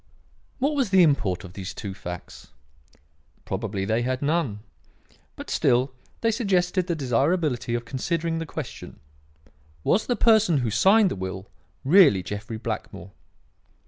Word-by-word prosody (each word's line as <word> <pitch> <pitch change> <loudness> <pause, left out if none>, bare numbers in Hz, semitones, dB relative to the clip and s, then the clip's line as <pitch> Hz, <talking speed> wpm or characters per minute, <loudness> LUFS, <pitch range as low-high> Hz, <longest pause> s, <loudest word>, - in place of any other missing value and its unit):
"What 285 +3 0
was 265 -7 +1
the 190 -1 +6
import 120 - +1
of 90 -2 -11
these 95 -1 -7
two 100 -4 -6
facts? 90 -2 -9 1.0
Probably 95 -1 -3
they 110 +3 0
had 130 +2 -2
none. 145 -9 0 0.7
But - - -8
still 130 +2 +2 0.3
they 230 - +2
suggested 185 -5 0
the 170 - 0
desirability 135 -1 0
of 120 0 -4
considering 165 +6 -2
the 165 - -5
question: 150 -3 -8 0.8
Was 210 - +1
the 245 - +1
person 220 -9 +4
who 110 - -1
signed 195 - +4
the - - -2
will 95 0 -5 0.4
really 145 - +6
Jeffrey 105 +3 -6
Blackmore? 105 -3 -6
140 Hz, 140 wpm, -25 LUFS, -, 1.0 s, the